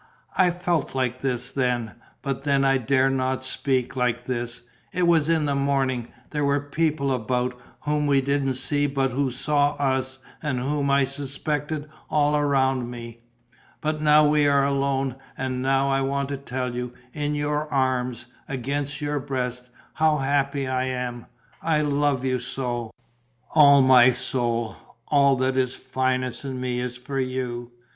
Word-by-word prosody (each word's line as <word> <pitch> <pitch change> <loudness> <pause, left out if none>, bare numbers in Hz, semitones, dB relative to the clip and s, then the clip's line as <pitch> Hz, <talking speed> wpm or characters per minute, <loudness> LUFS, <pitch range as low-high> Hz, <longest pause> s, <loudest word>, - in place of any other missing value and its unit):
I 185 -1 +5
felt 175 -5 -1
like 130 -1 -1
this 125 -1 -2
then; 125 -4 0 0.3
but 135 -2 -2
then 140 -1 +2
I 135 0 +3
dared 135 +2 +2
not 130 0 -1
speak 130 -1 -1
like 125 -2 0
this: 120 -1 -4 0.3
it 180 0 +1
was 165 -2 +3
in 160 -2 +2
the 145 - +1
morning; 135 -3 0 0.2
there 150 -1 -1
were 140 0 +2
people 145 -1 0
about, 125 +1 -1 0.3
whom 150 0 0
we 140 -1 +4
didn't 135 -1 0
see 145 +3 0
but 135 -1 0
who 135 +1 0
saw 145 +3 +1
us 130 -1 0 0.2
and 145 -4 -1
whom 140 +2 0
I 140 0 +4
suspected 145 +2 -3 0.2
all 150 0 +2
around 135 -4 +1
me; 115 -1 -8 0.6
but 155 0 -2
now 150 0 +6
we 150 -1 +3
are 140 -1 +4
alone 135 -1 0 0.2
and 130 -1 -2
now 135 +1 +2
I 135 0 +2
want 140 0 -1
to 140 - -2
tell 130 -2 -4
you, 125 0 -4 0.2
in 150 0 -1
your 150 +1 -1
arms, 125 -3 0 0.2
against 140 +3 -3
your 145 0 -1
breast, 125 -2 -3 0.2
how 155 -1 +3
happy 140 0 0
I 130 0 0
am! 125 -2 -4 0.3
I 155 -2 +2
love 145 -2 +1
you 130 -1 +1
so! 120 -2 -3 0.6
All 140 -3 +7
my 130 -1 +7
soul, 120 -3 -1 0.3
all 140 -2 +5
that 130 0 0
is 130 -1 +1
finest 130 -1 -1
in 130 -2 -4
me 125 -1 -2
is 125 0 -4
for 135 +2 -4
you. 125 -2 -3
135 Hz, 160 wpm, -24 LUFS, 125-145 Hz, 0.6 s, All